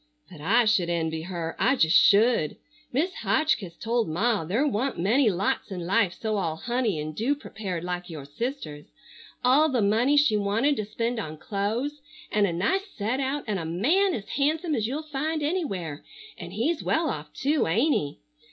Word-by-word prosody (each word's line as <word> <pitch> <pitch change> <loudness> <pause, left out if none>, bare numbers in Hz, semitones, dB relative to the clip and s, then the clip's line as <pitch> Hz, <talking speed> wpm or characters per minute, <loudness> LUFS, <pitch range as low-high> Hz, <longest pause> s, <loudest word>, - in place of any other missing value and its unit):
"But 160 -5 -11
I 225 +9 +3
should 205 -5 +2
envy 160 -2 -1
her, 170 -1 -4
I 270 - +3
just 160 -8 +3
should. 205 -7 +5 0.4
Mis' 325 +9 0
Hotchkiss 220 - 0
told 230 -3 0
Ma 205 +4 +1
there 210 - 0
wa'nt 265 0 -1
many 225 +8 +3
lots 190 +1 -1
in 180 -3 -5
life 195 -1 +1
so 215 -2 -1
all 165 -5 -1
honey 235 -2 -1
and 155 0 -5
dew 250 - +1
prepared 195 - -6
like 180 0 -4
your 155 -4 -7
sister's. 150 - -5 0.6
All 280 +5 +5
the 250 -6 +1
money 235 +8 +3
she 285 -7 +4
wanted 220 +8 +1
to 215 - -2
spend 230 +3 -2
on 155 -7 -5
clo'es, 225 - -2 0.3
and 210 -1 +3
a - - -1
nice 380 - 0
set 225 +6 -1
out, 275 +2 -1
and 210 -3 -2
a - - -4
man 305 - +2
as 200 - -6
handsome 310 +4 0
as 220 -5 0
you'll 290 +6 -3
find 305 +1 -2
anywhere, 195 - -2 0.3
and - - -9
he's 300 +9 0
well 320 0 +1
off 150 0 -7
too, 290 +2 +1
ain't 235 - +3
he? 145 0 -2
220 Hz, 185 wpm, -26 LUFS, 175-275 Hz, 0.6 s, should